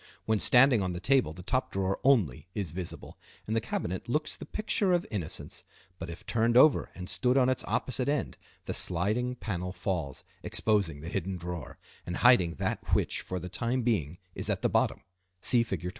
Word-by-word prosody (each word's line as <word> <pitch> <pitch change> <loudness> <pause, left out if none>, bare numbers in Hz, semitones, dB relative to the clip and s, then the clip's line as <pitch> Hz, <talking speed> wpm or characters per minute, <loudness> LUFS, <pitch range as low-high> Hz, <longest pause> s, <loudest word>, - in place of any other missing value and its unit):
When 110 -1 +1
standing 125 -1 +6
on 90 -1 -2
the 85 - -4
table 130 - +2
the 90 +3 -10
top 130 +7 -1
drawer 95 0 -1
only 110 - +2
is 95 -7 -2
visible, 90 +1 -7 0.3
and 110 - -2
the 115 - +2
cabinet 95 -3 -4
looks 150 +4 0
the - - -10
picture 210 -3 +1
of 175 0 +1
innocence, 95 -8 -5 0.4
but 85 - -6
if 85 - -9
turned 115 +1 +2
over 145 +2 +5
and 90 -1 -7
stood 125 +5 +1
on 130 -1 +4
its 130 - 0
opposite 130 +1 -1
end 145 0 -2 0.3
the - - -3
sliding 110 +8 +1
panel 90 -6 -4
falls, 90 -7 -3 0.2
exposing 100 -9 0
the 80 - -6
hidden 95 0 -3
drawer, 85 -5 -6 0.3
and 90 - -4
hiding 100 -10 +5
that - - -1
which - - 0
for 95 - -5
the 90 - -6
time 120 +7 -1
being 85 - 0 0.2
is - - -3
at - - -1
the - - +3
bottom - - +1 0.4
(see 120 +5 +4
Fig. 95 -7 -3
100 Hz, 190 wpm, -29 LUFS, 90-125 Hz, 0.4 s, standing